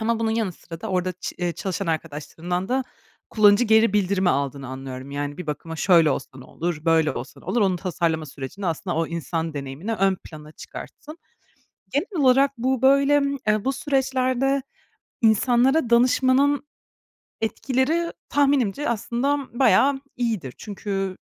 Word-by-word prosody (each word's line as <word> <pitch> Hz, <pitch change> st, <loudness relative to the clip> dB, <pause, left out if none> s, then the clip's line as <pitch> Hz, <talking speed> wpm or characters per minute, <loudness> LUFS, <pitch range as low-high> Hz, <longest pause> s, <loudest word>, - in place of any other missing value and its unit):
ama 225 Hz, +1 st, 0 dB
bunun 225 Hz, -1 st, 0 dB
yanı 220 Hz, -5 st, -1 dB
sıra 165 Hz, 0 st, -11 dB
da 220 Hz, -, -5 dB
orada 185 Hz, -1 st, 0 dB
çı 180 Hz, -, -7 dB
eee, 175 Hz, -1 st, -1 dB
çalışan 175 Hz, +1 st, -4 dB
arkadaşlarından 165 Hz, +3 st, -3 dB
da 260 Hz, +1 st, 0 dB, 0.5 s
kullanıcı 210 Hz, +2 st, +5 dB
geri 220 Hz, -1 st, +4 dB
bildirimi 195 Hz, -2 st, +2 dB
aldığını 140 Hz, -1 st, -2 dB
anlıyorum; 130 Hz, 0 st, -7 dB
yani, 145 Hz, +1 st, -4 dB
bir 180 Hz, -, -6 dB
bakıma 160 Hz, +2 st, -5 dB
şöyle 165 Hz, -4 st, +4 dB
olsa 135 Hz, -, -2 dB
ne 130 Hz, -, -11 dB
olur, 165 Hz, 0 st, -4 dB
böyle 160 Hz, -2 st, +3 dB
olsa -, -, -8 dB
ne -, -, -19 dB
olur, 240 Hz, -, 0 dB
onu 190 Hz, -3 st, +2 dB
tasarlama 165 Hz, -3 st, -1 dB
sürecinde 140 Hz, +8 st, -7 dB
aslında 170 Hz, +1 st, -2 dB
o 165 Hz, 0 st, +1 dB
insan 165 Hz, 0 st, -3 dB
deneyimini 140 Hz, +10 st, -5 dB
ön 195 Hz, -2 st, +2 dB
plana 155 Hz, -1 st, -11 dB
çıkarttın. 305 Hz, -, -10 dB, 0.7 s
Genel 330 Hz, +1 st, -1 dB
olarak 270 Hz, +2 st, +5 dB
bu 260 Hz, +1 st, 0 dB
böyle, 280 Hz, +2 st, +5 dB, 0.3 s
eee, 215 Hz, -1 st, +2 dB
bu 270 Hz, -, +1 dB
süreçlerde 265 Hz, -1 st, 0 dB, 0.6 s
insanlara 245 Hz, +4 st, +3 dB
danışmanın 260 Hz, +4 st, +3 dB, 0.7 s
etkileri 265 Hz, +9 st, 0 dB, 0.2 s
tahminimce 280 Hz, -2 st, +1 dB
aslında 240 Hz, +5 st, 0 dB, 0.2 s
bayağı 270 Hz, +1 st, +4 dB, 0.2 s
iyidir. 220 Hz, -, -2 dB
Çünkü 195 Hz, -2 st, -4 dB
205 Hz, 145 wpm, -23 LUFS, 165-260 Hz, 0.7 s, kullanıcı